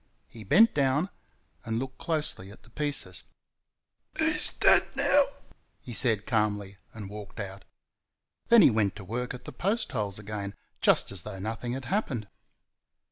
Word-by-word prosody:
He 115 - -11
bent 215 - +6
down 145 +6 +1 0.5
and 115 0 -2
looked 130 +2 -5
closely 155 - -2
at 105 - -14
the 120 - -19
pieces. 145 -10 -2 1.0
"He's - - +1
dead - - +5
now," - - +4 0.5
he 120 - -9
said 110 -3 +2
calmly, 105 -4 0
and 105 -3 -8
walked 105 +1 -9
out. 95 -1 -7 0.8
Then 235 -4 +8
he 135 - +7
went 105 -3 +1
to 105 - -9
work 125 +6 -3
at 125 - -12
the - - -6
post 215 +5 -1
holes 105 -5 -2
again, 105 -1 -5 0.3
just - - +4
as 95 -3 -1
though 105 0 -7
nothing 110 +5 -3
had 130 0 -5
happened. 130 - -1
110 Hz, 155 wpm, -28 LUFS, 100-135 Hz, 1.0 s, Then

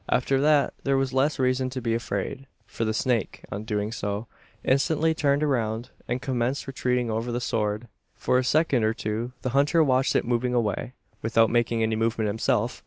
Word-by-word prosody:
After 135 +2 +2
that 150 -1 +3
there 135 -1 +2
was 135 -1 0
less 135 +3 +2
reason 130 -1 +1
to 130 0 -4
be 115 -2 -1
afraid; 115 +4 -3 0.2
for 115 - -3
the 110 - 0
snake, 115 -1 -1
on 100 +3 -5
doing 105 -1 -2
so, 105 -1 -3 0.4
instantly 150 +4 +2
turned 145 -1 +1
round 115 -5 -1 0.2
and 120 +1 -1
commenced 130 0 -1
retreating 125 -3 -1
over 115 +2 -2
the 120 - -1
sward. 110 -1 -1 0.3
For 125 - +1
a - - 0
second 140 -3 +2
or 110 +1 +1
two 110 +4 -3
the 130 - 0
hunter 145 +5 +3
watched 130 -2 +2
it - - +2
moving 125 +1 0
away, 115 +1 -1 0.3
without 115 0 +3
making 120 -1 +1
any 110 0 +1
movement 115 -1 0
himself. 110 +2 0
120 Hz, 185 wpm, -26 LUFS, 110-135 Hz, 0.4 s, that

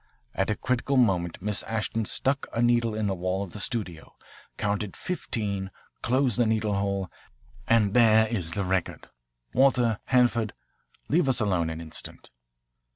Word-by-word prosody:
At 95 - 0
a 105 - +1
critical 130 +3 0
moment 90 -7 +1
Miss 105 -1 +1
Ashton 110 +1 -2
stuck 135 +5 +1
a - - -2
needle 120 -2 +2
in 110 -1 -1
the 100 - 0
wall 95 +2 -2
of 95 - -8
the 105 - -8
studio, 95 -8 -5 0.4
counted 105 -1 -2
fifteen 105 - -3 0.3
closed 125 -2 +1
the 120 - +4
needle 110 -1 +1
hole, 100 -2 -1 0.6
and 105 -3 +3
there 110 -2 +5
is 90 -8 -2
the 100 - -1
record 95 -1 -2 0.4
Walter, 125 -4 +3
Hanford, 120 -4 +2 0.5
leave 160 -2 +2
us 130 - +2
alone 90 -7 +1
an 80 0 -5
instant." 80 -5 -9
110 Hz, 155 wpm, -27 LUFS, 95-120 Hz, 0.6 s, there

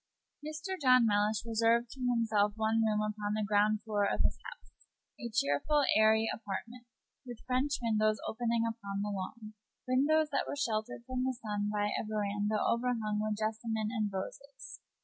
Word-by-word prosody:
Mr. 310 +4 -5
John 255 -3 +6
Mellish 210 +1 +1
reserved 230 +1 +2
to 265 - -11
himself 225 -4 +2
one 220 +1 +1
room 215 -1 +1
upon 210 0 -2
the 215 -1 -1
ground 210 +1 +2
floor 210 -2 0
of - - +1
his - - 0
house, - - -11 0.5
a 235 - -5
cheerful, 230 - +1
airy 220 +1 +4
apartment, 230 +3 -7 0.4
with 245 -3 -10
French 260 +3 0
windows 215 -1 +2
opening 235 0 0
upon 200 -3 -3
the 210 - -2
lawn 215 +3 -6 0.3
windows 295 +5 +3
that 275 - 0
were - - -3
sheltered 225 -4 -2
from 255 0 -2
the 260 -1 -1
sun 205 -2 -2
by 205 0 0
a - - -2
veranda 210 0 -1
overhung 230 -3 0
with 215 -1 -1
jessamine 220 0 -2
and 215 -4 -1
roses. 270 +8 -7
220 Hz, 165 wpm, -32 LUFS, 210-245 Hz, 0.5 s, John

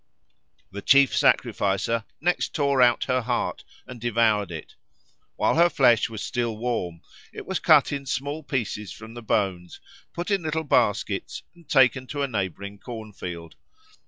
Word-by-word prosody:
The 100 +1 -7
chief 140 +2 +5
sacrificer 105 +3 +1
next 175 +3 -1
tore 140 -3 +2
out 120 -1 +4
her 130 -1 0
heart 120 +1 -2 0.2
and 125 -3 -10
devoured 115 -3 +2
it. 80 -3 -8 0.6
While - - +2
her 170 +1 +6
flesh 120 -8 +3
was 110 -2 -6
still 120 -3 -2
warm 110 -8 -3 0.3
it - - -9
was - - -2
cut - - +5
in 140 -1 -4
small 145 +4 -3
pieces 115 -8 -3
from 110 +1 -11
the 120 - -8
bones, 95 -5 -2 0.3
put 175 +4 -5
in 200 -2 +2
little 160 0 -2
baskets, 120 -8 0
and 170 -3 -21
taken 130 -2 +3
to 145 +1 -3
a - - 0
neighbouring 100 -3 -4
corn 110 -3 -8
field. 85 -3 -8
120 Hz, 160 wpm, -25 LUFS, 105-140 Hz, 0.6 s, her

